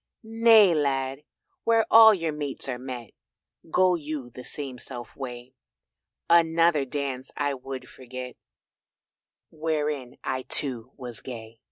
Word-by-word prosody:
"Nay, 225 -4 +6
Lad, 135 -1 -1 0.4
where 225 -1 +3
all 225 0 +10
your 165 -6 -1
mates 145 -3 -5
are 125 -2 -3
met 125 -4 -7 0.6
Go 185 +2 +4
you 150 -6 -5
the 125 +2 -10
selfsame 125 -3 -7
way, 125 -1 -8 0.7
Another 165 -3 +4
dance 135 -1 -4
I 145 -1 0
would 130 -1 -7
forget 130 0 -9 1.2
Wherein 150 -5 -2
I 130 0 -2
too 125 -6 +1
was 120 -3 -6
gay." 115 -3 -9
135 Hz, 120 wpm, -26 LUFS, 125-160 Hz, 1.2 s, all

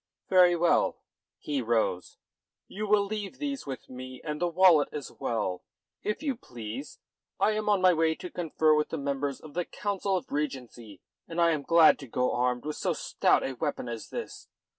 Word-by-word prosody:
"Very 180 -2 +6
well." 170 0 +2 0.4
He 145 -3 -2
rose. 110 -6 -1 0.5
"You 210 +2 -5
will 205 -1 +4
leave 210 +3 -5
these 280 - -4
with 135 -2 -6
me, 130 0 -9
and 150 0 -4
the 175 - +2
wallet 175 -3 +5
as 145 -4 -6
well, 105 -6 -2 0.4
if 210 +8 -3
you 280 -4 0
please. 120 - -8 0.4
I 215 - +3
am 215 0 -1
on 205 -2 +3
my 185 -1 +7
way 160 -1 +2
to 180 - -8
confer 160 -2 +2
with 150 0 +1
the 160 - -3
members 140 -1 -2
of 155 -2 -12
the 175 - -1
Council 200 0 -2
of 180 - -8
Regency, 125 -8 -5 0.3
and 165 +1 -5
I 170 -1 +5
am 155 -3 0
glad 165 +1 +6
to 135 - -9
go 125 +2 0
armed 125 +1 0
with 150 0 -4
so - - 0
stout - - +1
a 135 - -2
weapon 145 -1 -3
as 115 -2 -6
this. - - -7
155 Hz, 190 wpm, -28 LUFS, 130-185 Hz, 0.5 s, my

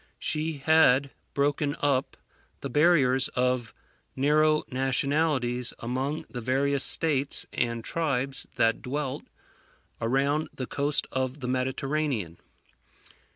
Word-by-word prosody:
She 155 +1 -1
had 140 -2 +3 0.2
broken 145 +1 0
up 140 -2 0 0.4
the 140 - -5
barriers 135 -4 +4
of 125 -2 -1 0.4
narrow 150 +3 +3
nationalities 130 -1 0
among 130 +6 -3
the 120 - -7
various 135 +3 +1
states 145 -4 +2
and 115 -1 -1
tribes 135 -4 -1
that 115 0 +2
dwelt 140 +1 -4 0.8
around 140 +6 0
the 130 - -4
coast 145 +3 +1
of 130 +2 -2
the 125 - -5
Mediterranean. 130 - -2
135 Hz, 105 wpm, -27 LUFS, 125-150 Hz, 0.8 s, barriers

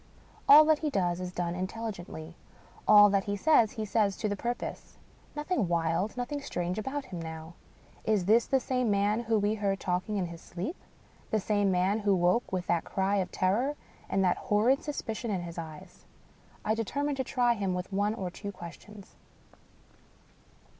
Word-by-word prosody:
All 300 +2 +10
that 310 -1 +4
he 310 - -1
does 180 -8 0
is 180 -1 -4
done 175 -1 -2
intelligently; 180 -4 -6 0.5
all 205 -1 +9
that 195 -1 +1
he 205 0 -2
says, 235 -4 +4
he 220 - -3
says 205 -2 +1
to 215 - -1
the 205 - -1
purpose. 240 +4 -5 0.4
Nothing 295 - -1
wild, 170 +5 0
nothing 285 +4 -3
strange 180 -6 -3
about 265 +5 -4
him 175 -2 -7
now. 160 0 -7 0.5
Is 210 -4 +1
this 225 +4 +4
the 270 - +3
same 250 -2 0
man 205 +2 +2
whom 225 -2 +1
we 205 +1 +2
heard 200 -2 -1
talking 185 +3 -1
in 190 - 0
his 170 -1 -9
sleep? 190 - -5 0.3
— - - -30
^the 220 - +2
same 205 0 +1
man 190 +3 +2
who 200 -2 +2
woke 180 +6 +2
with 185 -1 -2
that 170 -1 +1
cry 195 +1 0
of 185 -2 -1
terror 230 +10 +1 0.3
and 195 - +1
that 180 - +2
hor 210 +1 +1
rid 265 +3 +4
suspicion 235 -5 -4
in 190 -4 -1
his 170 0 -7
eyes? 165 +3 -10 0.6
I 215 - +2
determine 285 +6 -1
to 265 -1 -2
try 245 -1 +2
him 195 -5 -2
with 180 +2 -5
one 205 +2 +1
or 185 -5 -4
two 200 +3 -6
questions. 200 +3 -12
205 Hz, 185 wpm, -29 LUFS, 180-230 Hz, 0.6 s, All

